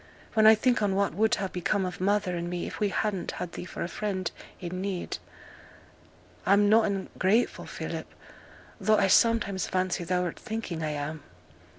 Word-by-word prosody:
When 220 -1 +6
I 220 - +9
think 245 +2 +2
on 200 -2 +1
what 200 0 +1
would 220 +3 +3
ha' 195 - -2
become 190 +2 0
of 180 0 -5
mother 200 -1 +1
and 170 0 -3
me 175 0 -3
if - - -6
we 210 - +2
hadn't 195 -2 -1
had 175 - -5
thee 175 - -7
for - - -5
a - - -2
friend 190 -1 -3 0.3
i' 175 - -5
need, 185 0 -3 1.2
I'm 200 +2 +4
noane 205 -3 +3
ungrateful, 210 +6 +1
Philip; - - -5 0.7
tho' 215 0 +3
I 200 - +4
sometimes 205 -1 +3
fancy 185 -1 0
thou'rt 180 0 -1
thinking 215 -7 -4
I 155 - -1
am.' 150 +1 -4
195 Hz, 175 wpm, -28 LUFS, 180-210 Hz, 1.2 s, I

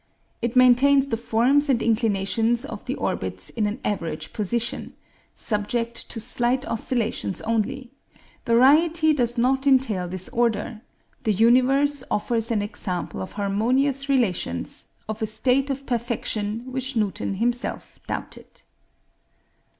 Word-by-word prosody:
It 235 +1 -2
maintains 265 +2 +5
the 230 - 0
forms 245 +6 +2
and 255 -4 +3
inclinations 225 +2 +1
of - - -8
the - - -2
orbits - - -4
in 215 -3 0
an 210 +5 -4
average 165 -6 -3
position, 230 +3 -2 0.4
subject 230 +2 -2
to 225 - -3
slight 245 +3 +1
oscillations 225 -4 -1
only; 235 +3 -2 0.5
variety 310 +7 +4
does 240 -3 0
not 265 +3 +1
entail 250 -9 +2
disorder; 215 +4 -1 0.4
the 215 - +2
universe 260 +6 +3
offers 225 +1 0
an 215 -3 +1
example 195 -4 -4
of 185 - -7
harmonious 255 +8 0
relations, 195 - 0 0.2
of 220 0 -5
a 220 - 0
state 255 +5 +1
of 275 0 -4
perfection 230 -3 -2
which 260 +1 -3
Newton 205 -2 -1
himself 240 +4 -2
doubted. - - -7
235 Hz, 120 wpm, -24 LUFS, 215-260 Hz, 0.5 s, maintains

